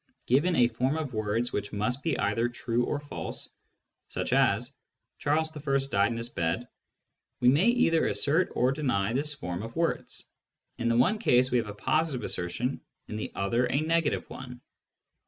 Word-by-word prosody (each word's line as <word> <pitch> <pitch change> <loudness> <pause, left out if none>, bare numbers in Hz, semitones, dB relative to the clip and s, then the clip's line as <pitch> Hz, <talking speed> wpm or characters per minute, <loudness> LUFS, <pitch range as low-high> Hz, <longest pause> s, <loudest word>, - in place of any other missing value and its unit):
Given 150 +8 +3
a 120 - +5
form 130 +5 -1
of 150 -5 -4
words 110 +2 -1
which 100 0 -2
must 125 +6 -1
be 165 - 0
either 105 +4 +1
true 120 0 -1
or 145 - -2
false, 145 0 -6 0.6
such - - -2
as - - +2 0.2
" - - -54
Charles 155 +2 0
I. 140 -2 0
died 100 +3 +3
in 115 - -3
his 115 +1 -3
bed," 85 +8 -2 0.7
we 125 - +5
may 150 - +4
either 235 -10 +3
assert 160 +6 +2
or 125 +1 +3
deny 125 -8 0
this 145 +3 +2
form 90 +1 -4
of 115 +1 -7
words: 165 0 -2 0.5
in 115 - +1
the 115 - +2
one 185 - +3
case 130 - +3
we 125 - +3
have 115 - -3
a 105 - -7
positive 145 +2 0
assertion, 110 +11 -2 0.3
in 105 - -5
the 105 - -4
other 115 +6 +1
a 140 - +1
'negative 165 0 0
one. 125 -2 -9
125 Hz, 180 wpm, -28 LUFS, 115-150 Hz, 0.7 s, a